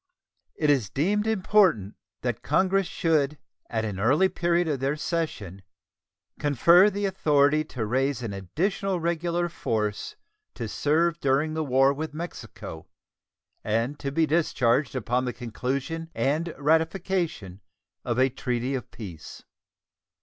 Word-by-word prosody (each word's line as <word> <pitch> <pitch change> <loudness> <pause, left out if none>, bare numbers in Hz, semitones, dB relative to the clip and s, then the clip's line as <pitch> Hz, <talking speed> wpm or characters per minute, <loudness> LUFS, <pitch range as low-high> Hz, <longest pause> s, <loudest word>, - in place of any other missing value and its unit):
It 150 -2 +2
is 125 -9 +1
deemed 205 - 0
important 185 - +3 0.3
that 120 -3 -2
Congress 195 0 +2
should 150 -3 +1 0.3
at 110 -1 -1
an 100 -3 -4
early 145 - +3
period 175 -1 +1
of 145 -4 -1
their 135 +3 0
session 150 - -3 0.8
confer 170 - +5
the 205 0 -2
authority 150 -5 +3
to 120 -6 -4
raise 130 +2 0
an 110 -4 -4
additional 180 - -1
regular 170 +1 0
force 105 -10 -2 0.4
to 115 - -4
serve 165 +8 +1
during 140 +3 +1
the 160 0 -1
war 135 0 +3
with 155 +1 -5
Mexico 155 - -8 0.8
and 115 +7 -1
to 140 - -3
be 160 +3 +2
discharged 135 -5 +1
upon 125 +1 0
the 125 - -2
conclusion 130 +7 -4
and 155 +5 0
ratification 160 - 0 0.4
of 120 -1 -2
a 130 +1 +4
treaty 125 +1 -2
of 130 -3 -4
peace. 90 -9 -10
145 Hz, 130 wpm, -26 LUFS, 120-170 Hz, 0.8 s, confer